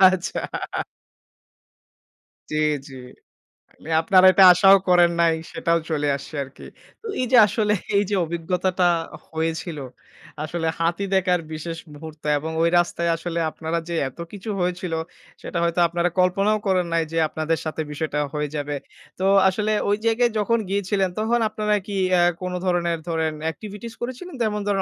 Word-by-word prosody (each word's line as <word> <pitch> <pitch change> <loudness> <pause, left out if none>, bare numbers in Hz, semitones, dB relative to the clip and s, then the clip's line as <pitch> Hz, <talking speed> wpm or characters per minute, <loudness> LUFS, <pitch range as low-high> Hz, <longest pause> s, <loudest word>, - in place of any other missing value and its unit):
আচ্ছা। 185 -1 -2 1.7
জ্বী, 155 - -1 0.3
জ্বী। 135 -1 -10 0.8
মানে 160 - -10
আপনারা 185 +2 +5
এটা 195 - +6
আশাও 195 +2 +7
করেন 175 -1 +5
নাই, 165 -1 +4 0.2
সেটাও 170 0 +1
চলে 150 -2 0
আসছে 140 +3 -9
আরকি। 135 0 -13 0.4
তো - - -16 0.2
এই - - +1
যে 250 - +6
আসলে 210 0 +1 0.2
এই 200 - +4
যে 205 - +1
অভিজ্ঞতাটা 180 +2 -1 0.5
হয়েছিল, 160 0 -3 0.7
আসলে 165 +1 -3
হাতি 170 +4 0
দেখার 180 -1 +2
বিশেষ 165 +1 -5 0.2
মুহূর্ত 155 0 -11 0.2
এবং 160 +2 -5
ওই 165 - +4
রাস্তায় 170 0 0
আসলে 170 0 -3
আপনারা 160 +1 -3
যে 170 - -2
এত 135 - -21
কিছু 205 +1 -8
হয়েছিল, 180 -1 -2 0.5
সেটা 170 - -5
হয়তো 170 +1 0
আপনারা 170 +1 0
কল্পনাও 195 +4 +3
করেন 185 -2 +2
নাই 165 - +2
যে, 165 - -3
আপনাদের 160 +1 -1
সাথে 160 0 -3
বিষয়টা 150 0 -2
হয়ে 150 -1 -2
যাবে। 145 0 -3 0.4
তো 190 - 0 0.2
আসলে 210 +3 -1 0.2
ওই 205 - +2
জায়গায় 235 +1 +3
যখন 230 +3 +2
গিয়েছিলেন 195 -1 0
তখন 230 +2 +1
আপনারা 210 0 0
কি 200 - -4 0.2
অ্যা 175 -1 +5 0.2
কোনো 180 0 -3
ধরনের 170 -2 0
ধরেন 160 -1 0 0.2
এক্টিভিটিস 215 +4 -9
করেছিলেন? 260 +9 -6
যেমন 210 -2 0
ধরেন 200 -1 +1
175 Hz, 155 wpm, -23 LUFS, 165-200 Hz, 1.7 s, আশাও